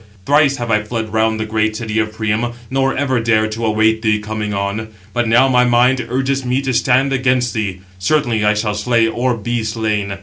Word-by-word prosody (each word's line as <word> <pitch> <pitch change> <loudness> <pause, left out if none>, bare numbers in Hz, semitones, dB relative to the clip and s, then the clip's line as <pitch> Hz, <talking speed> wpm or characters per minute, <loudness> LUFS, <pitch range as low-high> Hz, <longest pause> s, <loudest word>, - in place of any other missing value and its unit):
Thrice 145 0 +3
have 120 -1 -3
I 105 -1 +3
fled 110 0 -5
round 110 0 +1
the 110 - -2
great 110 0 -1
city 110 -1 -2
of 110 -1 -1
Priam, 110 +2 -2 0.2
nor 135 0 0
ever 130 -3 0
dared 110 -1 +1
to 115 +1 -2
await 110 +1 +2
thee 110 -2 +2
coming 105 0 -4
on; 100 +2 -3 0.3
but 120 0 0
now 120 +4 +4
my 125 -1 +3
mind 125 +1 +2
urges 135 +2 -1
me 125 +1 0
to 135 -1 -1
stand 130 +3 +2
against 125 -3 +1
thee: 100 -4 -3 0.2
certainly 115 0 +1
I 105 0 +3
shall 105 0 -1
slay, 115 +1 +1
or 120 +1 -1
be 120 +1 -2
slain. 110 -3 -2
115 Hz, 205 wpm, -17 LUFS, 110-125 Hz, 0.3 s, now